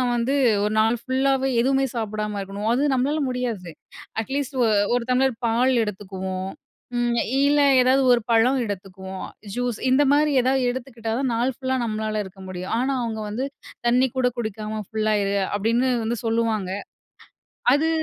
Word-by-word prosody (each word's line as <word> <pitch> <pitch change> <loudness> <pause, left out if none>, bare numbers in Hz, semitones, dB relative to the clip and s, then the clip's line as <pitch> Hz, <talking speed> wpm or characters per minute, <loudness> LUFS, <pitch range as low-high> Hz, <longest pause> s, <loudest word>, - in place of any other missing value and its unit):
வந்து 240 +4 0 0.3
ஒரு 210 +1 0
நாள் 225 +2 +3
ஃபுல்லாவே 270 0 +1
எதுவுமே 270 +2 +2
சாப்பிடாம 215 -2 -3
இருக்கணும். 200 +2 -4
அது 280 +3 +2
நம்மளால 280 +5 +1
முடியாது. 235 -8 -3 0.5
அட்லீஸ்ட் 275 +2 -3
ஒ - - +4 0.3
ஒரு 245 - 0
தம்ளர் 260 0 +3
பால் 240 +3 +3
எடுத்துக்குவோம். 190 -2 -5 0.5
ம் 240 0 +1 0.3
இல்ல 290 +1 +4 0.2
ஏதாவது 260 +2 +4
ஒரு 235 - +2
பழம் 250 +4 +4
எடுத்துக்குவோம். 190 -1 -6 0.3
ஜூஸ் 245 -2 -2
இந்தமாரி 290 +3 +4
ஏதாவது 260 +1 +2
எடுத்துக்கிட்டா 240 -3 -5
தான், 260 -3 0
நாள் 245 +3 +1
ஃபுல்லா 260 -1 -1
நம்மளால 215 -1 -2
இருக்க 190 +1 -13
முடியும். 185 +1 -5
ஆனா, 270 +2 0
அவுங்க 225 -2 -3
வந்து 245 +6 -2 0.4
"தண்ணீ 250 +2 +4
கூட 250 -1 +3
குடிக்காம 215 -1 -4
ஃபுல்லா 215 -1 0
இரு!" 200 0 0 0.2
அப்பிடின்னு 230 +5 +1 0.2
வந்து 235 +2 -1
சொல்லுவாங்க. 225 -4 0 1.0
அது 315 +3 +2
235 Hz, 145 wpm, -23 LUFS, 215-260 Hz, 1.0 s, ஒ